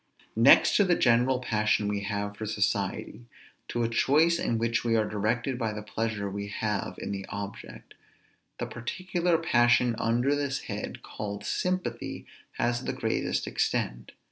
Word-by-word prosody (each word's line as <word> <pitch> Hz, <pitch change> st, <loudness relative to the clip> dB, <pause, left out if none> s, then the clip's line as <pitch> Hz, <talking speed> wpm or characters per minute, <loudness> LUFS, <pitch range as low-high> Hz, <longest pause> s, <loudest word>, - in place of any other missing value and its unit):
Next -, -, +6 dB
to 205 Hz, -, +5 dB
the 180 Hz, -3 st, +3 dB
general 125 Hz, +1 st, +3 dB
passion 105 Hz, -3 st, +1 dB
we 105 Hz, 0 st, -1 dB
have 100 Hz, 0 st, -3 dB
for 110 Hz, +1 st, -5 dB
society, 105 Hz, +2 st, -2 dB, 0.4 s
to 120 Hz, -, -1 dB
a -, -, +2 dB
choice 155 Hz, +8 st, +3 dB
in 115 Hz, -, 0 dB
which 115 Hz, 0 st, 0 dB
we 115 Hz, -1 st, +2 dB
are 110 Hz, -1 st, +2 dB
directed 115 Hz, +5 st, -1 dB
by 110 Hz, -3 st, -1 dB
the 105 Hz, 0 st, -6 dB
pleasure 105 Hz, -1 st, -2 dB
we 100 Hz, +1 st, -4 dB
have 105 Hz, 0 st, -2 dB
in -, -, -5 dB
the 100 Hz, -1 st, -4 dB
object, 100 Hz, 0 st, -8 dB, 0.6 s
the -, -, -3 dB
particular 175 Hz, +8 st, -1 dB
passion 120 Hz, -6 st, +3 dB
under 120 Hz, +5 st, +2 dB
this 140 Hz, -2 st, -1 dB
head -, -, -6 dB
called 100 Hz, -1 st, -6 dB
sympathy 180 Hz, -11 st, -2 dB, 0.3 s
has 120 Hz, +1 st, -1 dB
the -, -, -1 dB
greatest -, -, -1 dB
extent. -, -, -2 dB
115 Hz, 155 wpm, -28 LUFS, 105-125 Hz, 0.6 s, Next